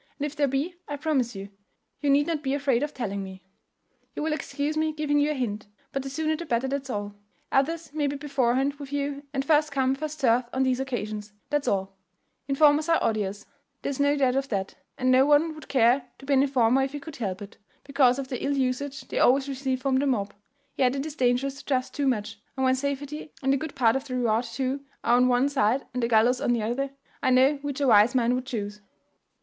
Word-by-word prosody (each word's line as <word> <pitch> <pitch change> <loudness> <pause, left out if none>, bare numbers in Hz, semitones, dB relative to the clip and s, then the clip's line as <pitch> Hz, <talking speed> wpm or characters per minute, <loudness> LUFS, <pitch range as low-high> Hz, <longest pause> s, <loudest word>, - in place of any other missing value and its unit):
And 290 - -2
if 295 0 -5
there 290 -1 +2
be, 275 +7 -1
I 290 - -3
promise 270 -6 0
you, 195 +1 -7 0.5
you 290 - 0
need 285 +1 +4
not 320 -2 -2
be 275 -1 -1
afraid 275 -4 +1
of 295 0 -2
telling 200 -7 -4
it - - -3
me. 190 0 -10 0.7
You - - -3
will 315 0 0
excuse 290 0 -3
me 310 0 0
giving 300 -1 +1
you 290 +1 +2
a 300 - -1
hint; 215 -6 -3 0.2
but 275 - -2
the 270 - -6
sooner 315 +3 -1
the 335 - -6
better, 240 0 0
that's 275 0 -3
all. 205 -3 -3 0.4
Others 320 +3 0
may 300 -2 0
be 280 - -2
beforehand 275 -1 +1
with 280 -1 -8
you, 285 0 -2
and 270 -1 -2
first 300 0 +3
come 265 -1 +1
first 305 +2 -5
served 245 -2 +3
on 260 - +1
these 260 -1 +1
occasions, 215 -5 -4 0.2
that's 295 -1 0
all. 195 0 -1 0.5
Informers 295 +3 +4
are 330 - +5
odious, 210 -2 -1 0.4
there's 280 -1 -3
no 285 +1 +3
doubt 260 -2 +2
of 275 0 -1
that, 195 -3 -2 0.2
and 255 0 +2
no 255 +1 +6
one 295 +3 +3
would 310 - -12
care 250 0 +3
to 270 - -13
be 280 - +1
an 265 - +5
informer 265 -2 +3
if 270 +1 -2
he 290 - -4
could 300 +1 -10
help 195 -6 -3
it, 205 -1 -10 0.3
because 275 -3 +3
of 275 -1 -4
the 255 - -4
ill 280 0 0
usage 270 +2 -1
they - - -4
always 270 +2 +4
receive 265 -1 -2
from 270 -2 +2
the 280 +2 +1
mob: 210 -7 -1 0.4
yet 255 0 +2
it 275 +1 -2
is 310 -2 -6
dangerous 260 +1 +1
to - - -13
trust 255 -2 -1
too 285 -1 -1
much; 220 -3 -2 0.2
and 265 - 0
when 260 0 +4
safety 280 +3 -4
and 270 +1 +3
a - - +2
good 315 +1 -6
part 230 -2 +3
of 270 +1 -2
the 255 -3 -4
reward 235 -1 +1
too 260 +4 -3 0.2
are 240 - +4
on 250 0 +4
one 250 +2 +3
side 265 -2 +1
and 250 - -2
the 235 - +1
gallows 235 +2 +3
on 240 - +2
the 230 -3 -1
other 255 +5 -1 0.3
I - - +2
know 260 +3 +4
which 285 -1 -4
a 285 - +1
wise 220 +1 +6
man 240 -1 +3
would 255 0 -3
chuse." 210 -4 -4
270 Hz, 240 wpm, -26 LUFS, 245-285 Hz, 0.7 s, no